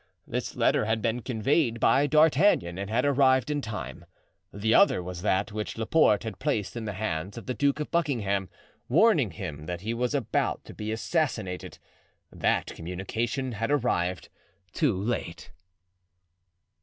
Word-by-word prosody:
This - - -4
letter - - +2
had 110 +1 0
been 115 +2 -1
conveyed 120 +1 0
by 140 +5 +4
D'Artagnan 150 - +3
and 100 0 -4
had 120 +5 +1
arrived 135 0 +3
in 145 -1 -1
time. 110 -4 -6 0.5
The 110 +3 0
other 90 - +5
was 90 -1 -6
that 100 +1 0
which 105 +1 -5
Laporte 110 -1 +3
had 110 -4 -6
placed 105 +1 -1
in 115 -2 -4
the 105 - -3
hands 95 0 -3
of 115 - -8
the 130 - -2
Duke 140 +5 +1
of 150 - -4
Buckingham, 105 - 0 0.4
warning 155 - +4
him 80 -5 -7
that 90 -1 -4
he 110 +3 -2
was 125 +4 -1
about 135 -6 -1
to - - -10
be 110 0 -5
assassinated; 110 - -2 0.5
that - - 0
communication 115 +9 -3
had 115 +2 -3
arrived 95 -11 0 0.4
too 130 - +1
late. 100 -5 -4
110 Hz, 155 wpm, -27 LUFS, 100-135 Hz, 0.5 s, other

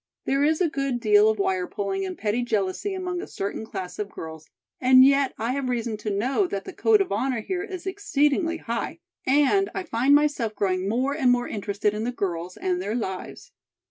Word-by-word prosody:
There 275 +1 +1
is 315 +3 +2
a 355 - +4
good 275 -5 -2
deal 210 -2 +5
of 220 - 0
wire 185 -2 0
pulling 195 -1 -3
and 185 - -6
petty 215 +3 0
jealousy 225 - -1
among 360 -1 -3
a - - -7
certain 200 +2 -4
class 185 -4 -6
of 210 -1 -3
girls, 160 -4 -9 0.3
and 255 0 +7
yet 275 -1 +3
I 230 +2 -1
have 265 -1 -2
reason 235 -2 -1
to 210 +1 -4
know 255 - +1
that 200 - -4
the - - -7
code 435 -2 +4
of 390 - -2
honor 255 -4 0
here 365 - -3
is 380 -3 -7
exceedingly 335 -4 +1
high, 235 -6 -4 0.3
and 295 +9 +3
I 385 - -2
find 275 -2 +3
myself 290 -7 +1
growing 190 -1 0
more 260 +6 0
and 270 -5 +2
more 245 0 +2
interested 205 0 -1
in 210 +1 -3
the 245 - -1
girls 180 -6 -4
and 180 -1 -1
their 205 +4 -2
lives. 190 -6 -5
240 Hz, 205 wpm, -25 LUFS, 200-290 Hz, 0.3 s, and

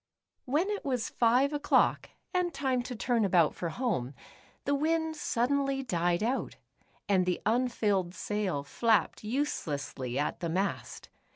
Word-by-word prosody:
When 310 +10 +1
it 410 - -3
was 255 -5 -1
five 250 +5 +3
o'clock, 290 0 +2 0.2
and 360 -1 +1
time 260 -5 0
to 245 +1 -6
turn 235 0 +1
about 175 -5 +4
for 170 - -4
home, 165 - -2 0.5
the 285 - +1
wind 320 +2 +1
suddenly 275 0 0
died 175 -4 0
out. 250 +4 -1 0.5
and 190 -3 +2
the 180 - +1
unfilled 210 -6 +1
sail 195 -10 -2
flapped 220 +10 +1
uselessly 145 - -2
at 145 - -1
the 170 - -2
mast. 190 +4 -3
230 Hz, 135 wpm, -30 LUFS, 180-275 Hz, 0.5 s, about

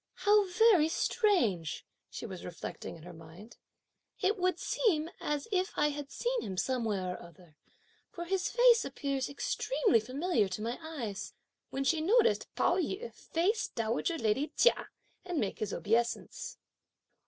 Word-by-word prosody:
"How 410 +1 +4
very 370 -4 +5
strange!" 325 - +1 0.2
she - - -7
was 190 -5 -7
reflecting 175 -2 -7
in 160 - -13
her 180 +1 -10
mind; 165 +7 -13 0.6
"it 395 +2 +2
would 365 -3 +1
seem 335 -9 0
as 295 -1 -2
if 375 0 0
I 295 0 +3
had 290 -1 -6
seen - - -1
him 190 -2 -5
somewhere 210 -6 -1
or - - -9
other, 170 -2 -16 0.5
for 345 -1 -6
his 380 +1 0
face 485 -1 +5
appears 275 -2 -2
extremely 400 - +1
familiar 255 - 0
to 200 - -5
my 235 +5 -3
eyes;" 240 -11 -5 0.4
when 270 - -2
she 310 +4 +2
noticed 460 +7 +3
Pao 350 - +2
yü 385 +7 -3
face 380 +7 0
dowager 230 +9 -1
lady 245 +4 +1
Chia - - +3 0.3
and 360 -2 -4
make 210 -6 -2
his 215 - -2
obeisance. 230 +3 -1
295 Hz, 150 wpm, -31 LUFS, -, 0.6 s, very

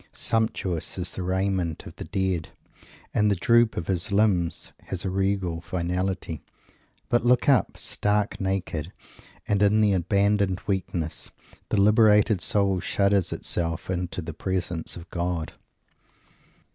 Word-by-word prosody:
Sumptuous 110 -8 -1
is 90 -1 -2
the - - -5
raiment 95 -2 -1
of - - -10
the - - -5
dead; 95 -4 -1 0.6
and 105 0 +3
the 100 - +3
droop 120 +3 +3
of 85 - -2
his 95 +2 -2
limbs 100 -5 +1
has 95 -1 -4
a 95 - -1
regal 95 -3 0
finality; 90 -2 -2 0.7
but 120 -1 +2
look 125 +1 +3
up! 135 -4 +3
Stark 105 0 -1
naked, 95 -4 -2 0.6
and 100 -1 +1
in 105 +1 +4
abandoned 100 +1 +2
weakness, 90 -5 -2 0.4
the 105 - +1
liberated 105 -1 +5
soul 100 -2 +2
shudders 100 +1 +1
itself 85 +1 -2
into 90 -1 -3
the - - -6
presence 90 -3 -3
of 85 0 -10
God! 85 -2 -2
95 Hz, 130 wpm, -26 LUFS, 90-105 Hz, 0.7 s, liberated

